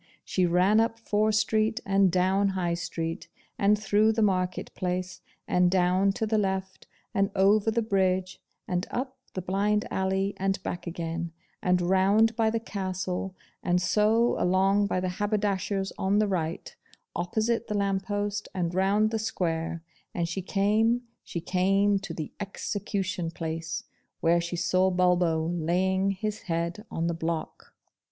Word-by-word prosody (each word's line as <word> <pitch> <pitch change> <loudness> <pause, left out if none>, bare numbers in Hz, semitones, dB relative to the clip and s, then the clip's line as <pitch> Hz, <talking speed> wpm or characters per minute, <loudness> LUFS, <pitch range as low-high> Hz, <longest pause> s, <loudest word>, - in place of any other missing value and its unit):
She 185 -2 +1
ran 185 +5 +4
up 225 0 +1
Fore 215 -1 +1
Street, 215 +2 +1
and 195 -1 +3
down 190 +3 +2
High 175 -2 0
Street, 165 -1 -4 0.3
and 210 0 +4
through 215 +1 +3
the 220 0 +1
Market 185 -3 0
place, 185 0 -3 0.3
and 180 0 +3
down 185 +1 +3
to 220 - -1
the 220 0 +1
left, 190 -1 -3 0.3
and 195 0 +2
over 200 +3 +4
the 230 +1 +1
bridge, 190 -3 0 0.3
and 180 0 -1
up 260 +1 -4 0.2
the 185 - -3
blind 205 +3 +1
alley, 190 +1 0
and 195 0 0
back 175 - -5
again, 170 0 -4 0.3
and 180 0 +2
round 195 +5 +3
by 225 -1 +2
the 225 +1 0
Castle, 185 -3 -4 0.3
and 180 0 +2
so 220 +5 +3
along 195 +3 +3
by 185 - 0
the 185 0 -1
Haberdasher's 200 -2 0
on 195 +2 +2
the 210 0 +3
right, 170 -4 -3 0.4
opposite 220 +6 0
the 210 - -1
lamp 195 -1 0
post, 205 0 -2
and 175 -2 -1
round 200 +4 +2
the 225 - -1
square, 165 -6 -2 0.3
and 170 -1 0
she 170 +3 -3
came 215 +6 +2 0.2
she 170 - -5
came 195 +3 +2
to 195 - -7
the 155 - -5
EXECUTION 195 -3 -3
PLACE, 165 0 -4 0.4
where 170 +1 +3
she 170 +1 -4
saw 185 +2 +2
Bulbo 180 -3 +2
laying 180 +3 +1
his 210 +2 -3
head 170 +6 -2
on 165 - -2
the 170 - 0
block!!! 165 -1 -4
190 Hz, 155 wpm, -27 LUFS, 180-210 Hz, 0.4 s, ran